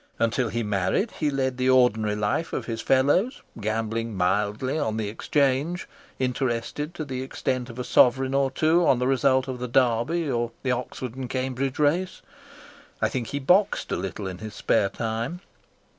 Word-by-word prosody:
Until 115 +1 +1
he 115 +2 -2
married 105 - 0
he 150 - +2
led 130 -2 -1
the 130 0 +1
ordinary 110 -5 +3
life 105 +10 -1
of - - -2
his 115 -1 -4
fellows, 145 - +2 0.2
gambling 110 +1 -2
mildly 105 +10 0
on 110 -7 -1
the 110 -2 -2
Exchange, 140 - 0 0.3
interested 130 +4 -2
to 155 - -4
the 130 -2 -4
extent 130 -1 -2
of 115 - -10
a 125 - -3
sovereign 130 +2 +4
or 135 -1 +2
two 160 +6 +2
on 130 - +5
the 125 - 0
result 130 0 +2
of 130 -1 -4
the 125 - -3
Derby 130 +7 +2
or 120 -3 -1
the 130 - +1
Oxford 125 -1 -4
and 130 -1 -6
Cambridge 130 +1 -2
Race. 165 +5 +1 0.8
I - - +2
think 120 -3 -3
he 140 - -3
boxed 180 +9 +2
a - - +1
little 95 +1 -4
in 90 -1 -5
his 110 0 -8
spare 100 -3 +2
time. 115 - -3
130 Hz, 175 wpm, -25 LUFS, 115-140 Hz, 0.8 s, on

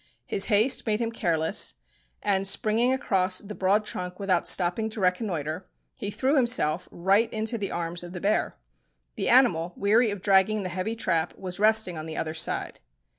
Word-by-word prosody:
His 195 - +3
haste 225 +4 +3
made 210 0 0
him 230 -1 -2
careless, 165 -7 0 0.5
and 195 -1 +1
springing 225 +5 +2
across 190 -7 +1
the 210 +2 -6
broad 205 +2 +1
trunk 180 -2 -5
without 190 -3 0
stopping 185 +5 +1
to 220 - -7
reconnoitre, 180 -3 -2 0.3
he 210 -6 -5
threw 265 +7 0
himself 210 - +1
right 195 +6 +1
into 220 +2 -2
the 205 -3 -3
arms 170 0 -4
of 175 - -9
the 180 - -6
bear. 205 +4 -1 0.6
The - - -2
animal, 180 -10 +3
weary 220 +4 +3
of 200 -2 -6
dragging 200 +1 +3
the 185 - -4
heavy 185 +5 -3
trap, 170 -7 -1
was 185 0 -7
resting 215 -5 +3
on 155 - -7
the 160 - -7
other 155 -1 -3
side. 160 - -1
195 Hz, 175 wpm, -26 LUFS, 180-220 Hz, 0.6 s, His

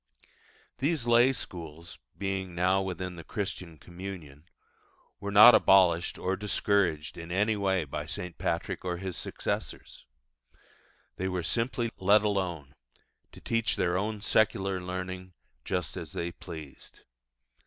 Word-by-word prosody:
These 145 -1 0
lay 120 +2 +5
schools, 85 - -7 0.2
being 95 -2 -3
now 95 +2 +3
within 90 -1 -4
the 85 - -8
Christian 90 -3 -5
communion, 85 -5 -9 0.7
were 100 +1 -4
not 105 +4 +10
abolished 90 -4 +5
or 95 +1 -1
discouraged 95 -6 0
in 85 0 -8
any 105 +4 +2
way 95 -3 +1
by 75 - -5
St. 90 -1 -5
Patrick 85 +2 -2
or 90 -1 -2
his 95 -1 -5
successors. - - -4 1.1
They 95 - -1
were 90 -2 -2
simply 115 +3 -1
let 100 +3 +5
alone, 90 -9 -2 0.6
to - - -13
teach 115 -1 0
their 90 0 +1
own 105 +2 -2
secular 95 -3 +1
learning 90 0 -5 0.3
just 90 -3 -2
as - - -7
they 85 0 -3
pleased. 80 -6 -10
95 Hz, 130 wpm, -29 LUFS, 85-100 Hz, 1.1 s, not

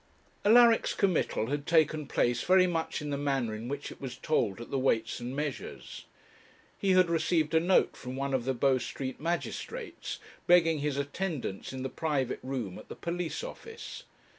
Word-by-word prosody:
Alaric's 230 +2 +6
committal 165 - +1
had 145 0 -2
taken 155 -2 +3
place 120 -2 +1
very 185 0 +5
much 165 -3 -2
in 145 - -3
the 140 - -1
manner 135 -6 0
in 110 +2 -6
which 140 +2 -4
it - - -12
was 130 -2 -5
told 115 -8 0
at 120 - -9
the 135 - +1
Weights 115 -4 +1
and 125 +2 -5
Measures. 145 -2 -5 0.7
He 195 -2 +3
had 185 -1 +5
received 165 -1 +1
a 160 - +6
note 180 +3 +3
from 125 0 -7
one 140 0 -2
of 125 -3 0
the 130 0 0
Bow 130 +1 +3
Street 130 +2 -5
magistrates, 175 - -4 0.3
begging 165 -3 +5
his 145 -1 -1
attendance 140 - -3
in 130 -1 -5
the - - -1
private 135 -3 -1
room 125 -8 -4
at - - -14
the - - -7
police 170 - -3
office. 460 -2 -8
145 Hz, 180 wpm, -30 LUFS, 130-170 Hz, 0.7 s, Alaric's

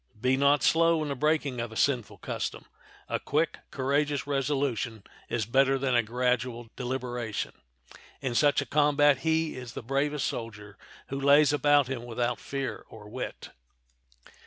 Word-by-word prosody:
Be 130 +3 +2
not 140 0 +3
slow 165 -1 +4
in 150 - -4
the 140 - -2
breaking 145 -3 0
of 115 -1 -5
a - - -10
sinful 125 -3 0
custom; - - -4 0.4
a - - -1
quick, 155 +4 0
courageous 140 +1 0
resolution 135 -6 -1 0.3
is 115 -3 -1
better 135 +4 +3
than 130 -1 0
a 120 - +5
gradual 120 0 -1
deliberation; 125 -3 -3 0.7
in 130 -3 -2
such 145 +3 +3
a - - -4
combat 145 0 +3
he 160 +2 0
is 125 -2 -8
the - - -6
bravest 140 +3 0
soldier 105 -3 -6 0.3
who 135 +1 -4
lays 145 +1 +5
about 145 -2 +4
him 130 -3 -4
without 120 0 -2
fear 135 -1 -4
or 105 -2 -12
wit. - - -6
135 Hz, 155 wpm, -28 LUFS, 120-145 Hz, 0.7 s, a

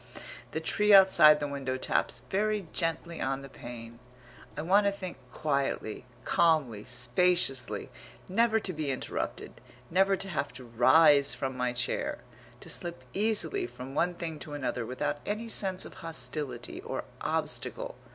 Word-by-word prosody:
The - - -3
tree 210 0 +1
outside 170 -6 +8
the 145 - -2
window 135 -2 -3
taps 125 -1 -1
very 210 0 0
gently 165 0 -2
on 135 +1 -1
the 135 - -9
pane.... 115 -2 -10 0.6
I 150 - -2
want 200 +4 +4
to - - +3
think 185 -5 -7
quietly, 140 -6 -2 0.2
calmly, 140 -11 +2
spaciously, 135 +2 0 0.4
never 225 +3 +3
to 185 - -2
be 155 -2 -3
interrupted, 130 - -4 0.3
never 195 +3 +4
to 195 - -4
have 145 - -2
to 130 +1 -10
rise 140 +5 +5
from 130 -1 -3
my 125 -1 0
chair, 125 0 -2 0.4
to - - -11
slip 170 -6 -2
easily 225 - +1
from 130 - -9
one 175 +4 +1
thing 160 -3 -5
to 150 - -8
another, 125 -5 -3
without 145 +3 -2
any 215 +3 -3
sense 190 -4 0
of - - -10
hostility, 130 -5 -2
or - - -4 0.2
obstacle. - - -2
150 Hz, 150 wpm, -29 LUFS, 130-185 Hz, 0.6 s, outside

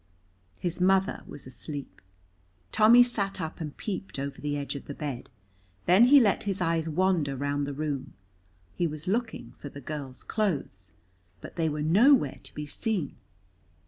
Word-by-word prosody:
His 175 0 -3
mother 190 +1 +3
was 145 - -9
asleep. 140 +2 -7 0.7
Tommy 235 +3 +7
sat 200 -5 -2
up 160 0 -5
and 150 -2 -6
peeped 195 -6 -5
over 140 0 -5
the 145 0 -1
edge 140 -1 -3
of 140 - -7
the 145 - -7
bed, 140 -5 -5 0.6
then 185 +7 +7
he 280 +3 +8
let 210 -6 +2
his 195 -2 0
eyes 165 -2 0
wander 165 -4 +1
round 145 +1 -1
the 145 - -3
room; 145 -3 -3 0.6
he 175 - 0
was 155 0 -7
looking 225 +3 -2
for 145 - -9
the 140 - -10
girl's 140 -2 -7
clothes, 140 - -2 0.5
but - - -10
they 165 -2 +1
were 150 0 -2
nowhere 200 - +4
to - - -10
be 150 - -4
seen. 180 - -2
160 Hz, 165 wpm, -28 LUFS, 145-195 Hz, 0.7 s, he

